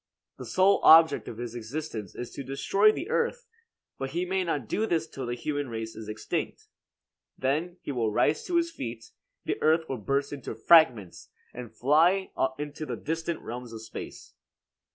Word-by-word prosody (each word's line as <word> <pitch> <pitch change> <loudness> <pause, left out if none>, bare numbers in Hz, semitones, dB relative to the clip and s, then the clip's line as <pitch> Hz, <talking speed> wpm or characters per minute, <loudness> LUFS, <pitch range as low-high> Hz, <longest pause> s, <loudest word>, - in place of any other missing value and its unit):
The - - -7
sole 190 +2 +3
object 160 0 +7
of 110 - -7
his 120 -1 -5
existence 120 - -6
is 120 - -6
to 140 - -7
destroy 195 +10 +3
the 355 - -5
earth; 475 +1 0 0.5
but 135 - -3
he 175 +2 -1
may 190 +1 0
not 145 -9 -2
do 220 - 0
this 165 -4 0
till 130 -5 -6
the 120 - -2
human 145 +1 -3
race 115 -1 -5
is 110 -1 -8
extinct. 110 0 -4 0.7
Then 155 +7 -1
he - - -4
will 115 -5 0
rise 150 +8 +2
to 355 - -2
his 335 0 +2
feet, 115 - -7 0.3
the - - -2
earth 160 +1 +3
will 130 - -4
burst 140 +6 -1
into 140 -3 -6
fragments 125 - +4 0.2
and 120 -2 -8
fly 165 +11 +3 0.3
into 150 +1 -6
the - - -3
distant 165 +1 -3
realms 120 0 -7
of 110 -1 -8
space. - - -9
145 Hz, 175 wpm, -28 LUFS, 120-170 Hz, 0.7 s, object